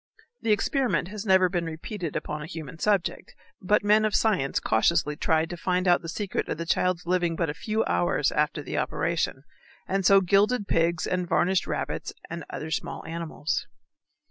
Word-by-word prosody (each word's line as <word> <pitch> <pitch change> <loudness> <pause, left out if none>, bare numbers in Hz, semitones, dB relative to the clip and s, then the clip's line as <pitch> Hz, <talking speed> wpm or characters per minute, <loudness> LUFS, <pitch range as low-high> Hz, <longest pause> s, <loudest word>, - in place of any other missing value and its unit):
The 225 - +1
experiment 240 - +1
has 210 +1 -6
never 190 -1 +5
been 175 -1 -2
repeated 165 +2 -5
upon 150 0 -3
a 150 - -6
human 160 -1 -8
subject, 200 -3 0 0.3
but 205 +3 +2
men 210 +1 +4
of 215 -1 +1
science 185 -12 +2
cautiously 150 +6 +2
tried 160 +1 +1
to 175 - -5
find 180 +2 0
out 175 - +4
the 165 - -7
secret 200 +3 -3
of - - -2
the 170 - -4
child's 180 +1 0
living 175 -1 +1
but 165 -2 0
a - - -6
few 215 +6 -1
hours 90 0 +1
after - - 0
the - - -2
operation, - - -1 0.4
and 195 0 0
so 195 +2 +7
gilded 200 +4 +2
pigs 165 0 +1
and 180 -1 -2
varnished 180 +1 +2
rabbits - - -3 0.2
and 170 -1 -5
other 160 +1 -6
small - - -3
animals. 165 -2 -3
175 Hz, 180 wpm, -26 LUFS, 165-200 Hz, 0.4 s, so